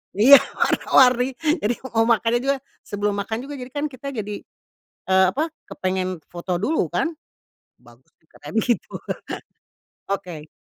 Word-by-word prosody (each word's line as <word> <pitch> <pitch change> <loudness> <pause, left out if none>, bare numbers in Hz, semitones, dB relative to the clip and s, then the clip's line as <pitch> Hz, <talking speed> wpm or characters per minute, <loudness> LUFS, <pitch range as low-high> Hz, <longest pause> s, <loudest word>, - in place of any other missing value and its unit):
Iya, 265 +7 +9 0.2
warna-warni. 255 0 +3 0.3
Jadi 225 +4 +2 0.2
mau 225 0 +3
makannya 230 +1 +3
juga, 275 0 +2 0.3
sebelum 205 0 -2
makan 220 +2 -3
juga, 290 - -6
jadi 250 0 -8
kan 290 +2 -2
kita 260 +2 -9
jadi, 210 -1 -4 0.7
eee, 190 0 +5
apa, 315 +3 -1 0.2
kepengen 185 -1 -2
foto 175 +1 -3
dulu 310 +8 +1
kan, 330 - 0 0.7
"Bagus 120 +2 -21
nih." 160 - -37
Katanya 145 +6 -11
begitu. 240 0 0 1.2
Oke. 175 -6 -4
215 Hz, 135 wpm, -23 LUFS, 185-255 Hz, 1.2 s, Iya